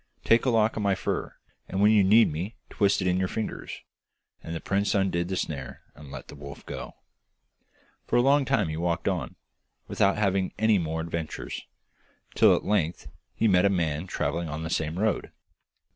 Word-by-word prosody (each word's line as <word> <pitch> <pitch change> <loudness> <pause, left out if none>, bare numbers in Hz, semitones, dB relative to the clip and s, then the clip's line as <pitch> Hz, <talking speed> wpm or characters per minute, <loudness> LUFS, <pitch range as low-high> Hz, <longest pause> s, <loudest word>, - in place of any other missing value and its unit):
Take 115 +3 +4
a - - +3
lock 110 -2 +2
of 110 - -2
my 100 -1 +2
fur, - - -3 0.3
and 95 - -2
when 105 +2 +6
you 105 -2 +5
need 110 +2 +5
me 90 +9 -4 0.2
twist 100 -1 +2
it - - 0
in 90 0 +2
your 95 - +1
fingers.' 110 +3 -5 0.6
And 80 - -6
the - - -3
prince 100 +4 0
undid 95 -3 +1
the 95 - -2
snare 70 -7 -5
and 75 -2 -13
let - - -8
the - - -11
wolf 70 -1 -10
go. - - -7 1.1
For - - 0
a 120 - +6
long 140 +2 +4
time 115 - +1
he 80 - -4
walked 85 0 -1
on, - - -2 0.5
without 100 +1 +2
having 95 -2 +1
any 110 -2 +3
more 80 -1 -2
adventures, 80 -1 -5 0.7
till - - +6
at - - -4
length 90 -5 0 0.3
he 115 - +2
met 90 -3 +4
a 100 - +5
man 85 -3 -1
travelling 85 -1 -2
on 75 +2 -4
the 80 - -4
same 80 +2 -1
road. 110 +2 0
95 Hz, 190 wpm, -27 LUFS, 80-105 Hz, 1.1 s, when